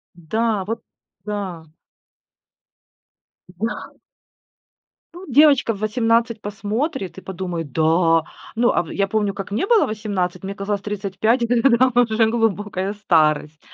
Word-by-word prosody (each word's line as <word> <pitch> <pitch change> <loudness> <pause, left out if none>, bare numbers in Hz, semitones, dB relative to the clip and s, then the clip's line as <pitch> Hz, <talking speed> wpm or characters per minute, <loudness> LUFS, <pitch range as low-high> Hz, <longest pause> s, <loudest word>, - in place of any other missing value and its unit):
Да. 210 +4 -1
Вот 225 +4 -4 0.4
да. 185 -7 -5 1.8
Да. 195 +6 -6 1.2
Ну, 360 +2 -10
девочка 280 -4 +4
в 200 - -11
18 230 +1 +1
посмотрит 210 - -3
и - - -6
подумает: 175 -6 -5
"Да." 165 +1 +3 0.3
Ну, 240 +2 +3
а, - - +1
в - - -11
я 200 -1 0
помню, 205 -2 0
как 195 0 -6
мне 220 - -1
было 460 -1 +4
18, 195 -4 -3
мне 195 +1 -4
казалось 200 0 -3
35, 210 +3 0 0.4
там 255 0 +4
уже 225 -2 +4
глубокая 205 -4 -1
старость. 155 -6 +1
205 Hz, 120 wpm, -21 LUFS, 185-225 Hz, 1.8 s, девочка